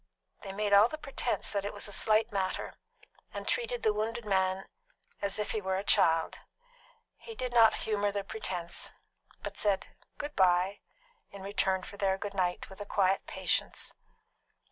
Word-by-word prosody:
They 200 - -8
all 195 - -6
made 205 0 0
the 215 +9 +6
pretence 275 -4 -2
that 200 -2 -1
it 205 - -4
was 205 - -4
a - - -9
slight 220 +3 +3
matter, 190 -2 -2 0.6
and - - -6
treated 485 0 0
the 215 - +4
wounded 225 +2 -2
man 190 -1 +1 0.6
as 200 -1 +1
if 210 0 -1
he 215 - -1
were 190 -1 -1
a 190 - -1
child. 165 -4 +3 0.8
He 455 - -10
did 250 - -3
not 230 -2 +7
humour 205 -2 +1
the 200 0 -2
pretence, 185 -4 -4 0.5
but - - -5
said 200 -2 +1 0.3
"Good 295 0 -5
bye" 185 +1 +3 0.5
in 200 -1 -10
return 190 -1 +1
for 200 - -9
their 195 -1 +1
"Good 200 +1 -5
night" 180 -2 0
with 190 +1 -11
a - - -4
quiet 195 -1 +2
patience. - - -1
Mrs. - - -47
200 Hz, 175 wpm, -31 LUFS, 190-215 Hz, 0.8 s, not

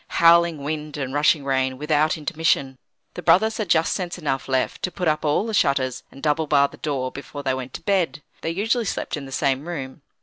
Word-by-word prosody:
Howling 170 -3 +5
wind 150 0 -4
and 135 -2 -4
rushing 145 0 +3
rain, 130 -1 0
without 150 +2 +1
intermission. 145 -4 0 0.3
The - - -6
brothers 220 +4 +4
had 215 -6 -3
just 165 -1 +3
sense 180 -2 -3
enough 140 -6 -2
left 130 -1 -1
to 180 - -2
put 180 -3 -3
up 155 0 +1
all 150 +7 +1
the 225 - -4
shutters, 140 -8 +1
and 135 - -15
double 155 +1 +1
bar 140 -1 +4
the - - -14
door, 135 -4 -2
before 145 +1 -8
they 130 - +1
went 130 0 -6
to - - -8
bed. 180 -7 0 0.2
They - - -2
usually 225 +7 0
slept - - -3
in 140 -2 -7
the - - -11
same 140 +2 0
room. 140 -5 -6
150 Hz, 215 wpm, -23 LUFS, 135-170 Hz, 0.3 s, Howling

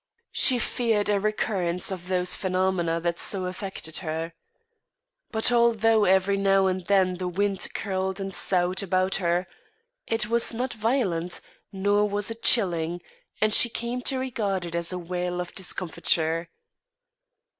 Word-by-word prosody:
She 255 - +5
feared 225 -4 0
a 205 -1 +2
recurrence 195 -4 -1
of 180 -2 -6
those 180 -1 +1
phenomena 185 -3 0
that 170 0 -2
so 190 -2 -2
affected 185 -3 -5
her. 165 -1 -4 1.0
But, 220 +2 +1
although 225 -2 +4
every 190 +1 +3
now 195 0 +3
and 185 -1 0
then 190 -2 +3
the 180 0 -3
wind 195 +2 -1
curled 190 -1 -2
and 195 0 -4
soughed 180 +1 +1
about 185 0 0
her, 175 0 0 0.6
it 225 -1 +1
was 235 +1 +1
not 250 +2 -2
violent, 215 -7 -1 0.3
nor 205 +1 +1
was 205 +2 -1
it 225 0 -8
chilling; 175 -6 +3 0.4
and 215 0 +2
she 240 - +6
came 235 +2 -4
to 265 - -1
regard 210 -8 -2
it 170 - -7
as 170 0 -1
a 180 - -3
wail 180 0 -3
of 180 0 -5
discomfiture. 165 -2 -1
190 Hz, 145 wpm, -26 LUFS, 180-215 Hz, 1.0 s, she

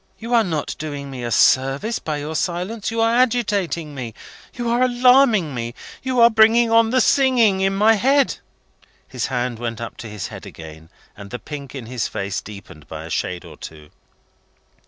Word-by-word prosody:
You 230 +2 -5
are 230 -1 +5
not 160 -7 -3
doing 145 -2 -6
me 125 -2 -7
a 120 - -3
service 135 - +2
by 155 -2 -4
your 150 +2 -5
silence. 185 +5 -2
You 225 0 -1
are 225 0 +3
agitating 205 -10 0
me, 120 -5 -7 0.4
you 240 -1 -4
are 235 +1 +1
alarming 250 - +4
me, 120 -1 -5 0.3
you 260 -1 -1
are 235 - +8
bringing 225 +1 +4
on 230 0 +4
the 255 +2 +2
singing 240 -7 +3
in 195 0 +1
my 215 +3 +5
head." 270 +6 +2 0.7
His - - -3
hand 125 -2 -3
went 115 -1 -4
up 115 -1 -7
to 115 - -8
his 105 -1 -6
head - - -10
again, 80 0 -12 0.3
and 100 -1 -11
the 125 - -5
pink 140 0 -9
in 130 -4 -7
his 120 -1 -3
face 100 -1 -4
deepened 95 -8 -12
by 80 0 -8
a 80 - -9
shade 90 -1 -3
or 80 -3 -12
two. 75 -1 -11
155 Hz, 190 wpm, -21 LUFS, -, 0.7 s, are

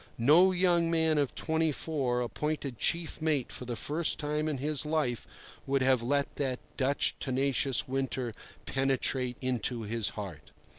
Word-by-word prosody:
No 155 +10 +6
young 175 -2 +2
man 160 -2 +2
of 140 -3 -1
twenty 160 -1 0
four 135 -5 -1
appointed 135 +2 -3
chief 170 -2 0
mate 150 -5 0
for 125 - -6
the 120 -1 -3
first 155 +7 +1
time 150 +1 -1
in 150 -3 -1
his 145 +1 +1
life 150 -6 -1 0.4
would 135 -1 +2
have 130 -2 +3
let 140 +4 -1
that 130 -3 -1 0.2
Dutch 140 +1 +1
tenacious 135 0 +1
winter 130 -2 -2 0.3
penetrate 135 -2 0
into 125 -2 -1
his 110 0 0
heart. 90 -8 -7
135 Hz, 150 wpm, -30 LUFS, 125-155 Hz, 0.4 s, No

